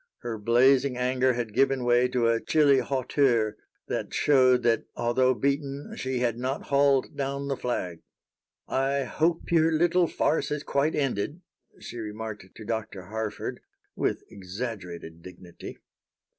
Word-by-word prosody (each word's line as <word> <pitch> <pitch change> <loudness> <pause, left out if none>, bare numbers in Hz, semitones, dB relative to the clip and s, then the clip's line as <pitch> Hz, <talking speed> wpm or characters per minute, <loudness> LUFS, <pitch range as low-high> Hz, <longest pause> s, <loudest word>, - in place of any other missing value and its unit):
Her 115 -2 -4
blazing 125 +4 +3
anger 130 +1 +2
had 120 -3 -4
given 135 +1 +2
way 120 +1 +4
to 125 -2 +1
a 115 0 +2
chilly 145 -3 +4
hauteur 130 -5 +1 0.3
that - - -3
showed 130 -3 +4
that, 115 -2 +2
although 130 +2 +2
beaten, 140 +1 -2
she 130 0 -3
had 120 -1 0
not 130 +3 -2
hauled 140 -1 +2
down 140 0 -3
the 135 - 0
flag. 90 -10 -3 0.7
"I 135 +1 0
hope 165 +7 -1
your 165 -1 +4
little 175 +2 +3
farce 160 - 0
has 150 0 -3
quite 140 +3 0
ended," 140 - -2 0.4
she 120 - -8
remarked 110 -2 -6
to 110 - -10
Dr. 110 -4 -4
Harford, 110 -1 -4 0.4
with - - -1
exaggerated 90 -5 -7
dignity. 90 -1 -11
125 Hz, 140 wpm, -27 LUFS, 110-140 Hz, 0.7 s, way